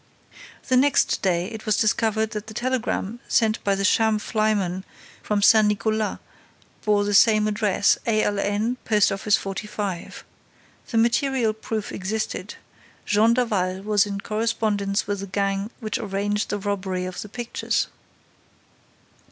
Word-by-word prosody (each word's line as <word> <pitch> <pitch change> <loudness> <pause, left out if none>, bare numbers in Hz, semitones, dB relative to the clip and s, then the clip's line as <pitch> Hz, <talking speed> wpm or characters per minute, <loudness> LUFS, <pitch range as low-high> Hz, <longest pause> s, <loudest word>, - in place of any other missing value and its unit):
The 255 - +3
next 280 +2 +3
day, 175 -2 +1
it 220 -1 -8
was 215 - +2
discovered 220 0 +1
that 210 0 -5
the 220 - -10
telegram 240 -3 -2
sent 220 -1 +1
by 200 -1 +2
the 195 0 -1
sham 220 0 +3
flyman 210 -4 0 0.4
from 205 -1 -1
Saint 215 0 +6
Nicolas 215 +1 0 0.7
bore 205 -1 +2
the 205 0 -1
same 215 +1 +5
address: 210 -2 +2
'A.L.N., 215 +1 0
Post 210 -2 +3
office 200 +2 +2
45.' 195 -2 -5 0.7
The 230 - -1
material 235 0 +2
proof 220 -1 -4
existed: 215 +3 -4 0.5
Jean 220 +3 +3
Daval 195 -6 0
was 210 -1 +2
in 200 -1 -4
correspondence 215 -2 -1
with 205 -1 -2
the 200 - -5
gang 195 +1 -1
which 215 -3 -3
arranged 205 0 -2
the 205 - -1
robbery 190 -2 -2
of 185 0 -5
the 210 - -8
pictures." 240 +2 -2
210 Hz, 135 wpm, -24 LUFS, 200-220 Hz, 0.7 s, Saint